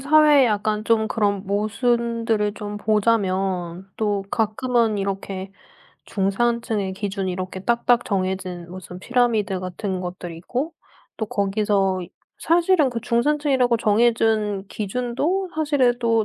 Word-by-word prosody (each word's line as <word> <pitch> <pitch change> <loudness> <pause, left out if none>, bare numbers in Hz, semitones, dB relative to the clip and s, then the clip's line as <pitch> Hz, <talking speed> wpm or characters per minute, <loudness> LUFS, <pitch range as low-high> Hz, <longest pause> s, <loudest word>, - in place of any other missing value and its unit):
사회에 295 0 +6
약간 215 0 0
좀 220 -1 +2
그런 200 -3 0
모순들을 225 0 0
좀 210 0 -6
보자면 195 -4 0
또 205 -2 0
가끔은 225 0 +1
이렇게 195 -1 -4 0.6
중산층의 210 0 0
기준이 195 -1 -3
이렇게 185 +1 -5
딱딱 235 +3 +2
정해진 185 -3 -2
무슨 180 0 -9
피라미드 225 -5 +1
같은 185 +1 -4
것들이 175 -2 -6
있고 260 - -3 0.4
또 220 - -3
거기서 200 -2 +1 0.4
사실은 335 -3 +3
그 235 -1 -4
중산층이라고 255 +1 +2
정해 225 +2 +4
준 215 -3 0
기준도 250 - -2
사실은 285 -6 +2
또 230 -2 +2
215 Hz, 275 characters per minute, -22 LUFS, 195-240 Hz, 0.6 s, 사회에